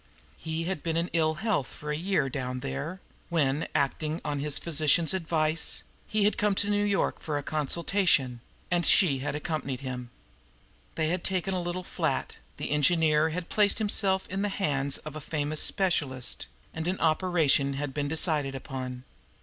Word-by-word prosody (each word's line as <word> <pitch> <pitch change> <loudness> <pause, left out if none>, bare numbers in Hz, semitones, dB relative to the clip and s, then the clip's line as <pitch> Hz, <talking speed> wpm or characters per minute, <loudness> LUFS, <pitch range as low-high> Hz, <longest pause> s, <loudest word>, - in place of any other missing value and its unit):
He 160 +1 -4
had 180 -2 -3
been 165 -1 -1
in 170 +1 -1
ill 160 -1 +2
health 195 - -1
for 150 0 -7
a - - -1
year 175 -2 0
down 130 -1 -4
there, 140 +7 -5 0.3
when, 150 -3 +1
acting 155 +2 0
on 145 -1 -2
his 150 0 +2
physician's 160 +1 +3
advice, 160 -3 +1 0.2
he 215 -1 +1
had 210 - +2
come 205 -1 +2
to 205 +1 0
New 205 0 +1
York 200 -1 0
for 150 -2 -3
consultation, 155 -4 +1 0.3
and 175 -1 +2
she 160 -9 +5
had 145 +2 -3
accompanied 150 -4 -3
him. 125 -2 -6 0.9
They 160 -1 0
had 175 +1 -1
taken 190 0 +1
a 185 - -1
little 175 +1 -4
flat, - - -2 0.2
the - - -4
engineer 155 +1 +3
had 170 +2 -4
placed 205 -1 +3
himself 200 -3 +2
in 195 +1 -3
the 205 - 0
hands 140 -8 0
of 155 -1 -9
a 155 - -6
famous 150 0 -1
specialist, 145 -9 0 0.3
and 160 +1 -4
an 185 +1 -1
operation 155 -4 +2
had 140 0 -4
been 145 0 -2
decided 150 -3 +1
upon. 130 -1 -6
155 Hz, 170 wpm, -28 LUFS, 140-180 Hz, 0.9 s, she